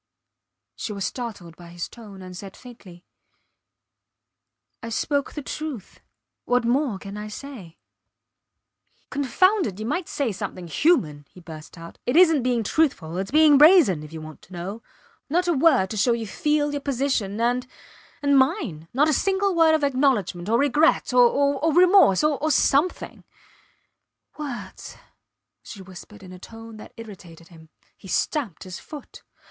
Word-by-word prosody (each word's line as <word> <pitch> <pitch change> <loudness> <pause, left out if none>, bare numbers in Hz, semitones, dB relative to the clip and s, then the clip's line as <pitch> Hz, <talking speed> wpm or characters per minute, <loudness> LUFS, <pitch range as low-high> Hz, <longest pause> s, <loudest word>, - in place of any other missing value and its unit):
She 215 - -5
was 200 -2 -4
startled 205 -9 -6
by 175 0 -14
his 170 0 -6
tone, 205 -5 -13
and 185 0 -10
said 195 +1 -10
faintly 200 -8 -14 1.8
I 230 - -6
spoke 280 +5 -2
the 295 - -6
truth. 290 - -7 0.5
What 245 -1 +1
more 250 -2 0
can 200 +1 -9
I 210 0 -6
say? 210 - -10 1.3
Confound 370 - +2
it! 195 0 -7
You 215 - -5
might 340 +9 -2
say 275 -6 -2
something 195 -2 -6
human, 155 - +1
he - - -16
burst 160 -1 -12
out. 165 0 -12
It 245 - 0
isnt 325 -5 +5
being 245 -2 0
truthful; 205 - 0
its 195 +1 -4
being 300 -1 +5
brazen 300 - +6
if 150 0 -11
you 160 -1 -8
want 155 0 -11
to 185 - -17
know. 190 +6 -6 0.5
Not 355 +4 +1
a 345 - +2
word 265 - +3
to 215 - -4
show 235 +4 +3
you 230 -1 -3
feel 295 +6 0
your 285 -1 -4
position, 255 -7 -2
and 245 +2 0 0.6
and 285 0 +3
mine. 260 - -1
Not 290 +3 +4
a 310 - +2
single 390 +4 +1
word 325 -2 +4
of 310 - -2
acknowledgment, 255 -10 0
or 230 - +3
regret 285 +1 +2
or 275 +3 +3 0.2
remorse... 360 - +5
or... 300 0 0
something. 295 +4 +1 1.2
Words! 240 -10 -8 0.6
she 190 - -11
whispered 190 +3 -13
in 185 - -12
a 180 - -12
tone 225 +2 -12
that 215 - -13
irritated 180 -7 -12
him. 160 -2 -17 0.3
He 195 - -15
stamped 230 - -2
his 185 -1 -8
foot. 300 -3 -11
235 Hz, 155 wpm, -23 LUFS, 190-290 Hz, 1.8 s, brazen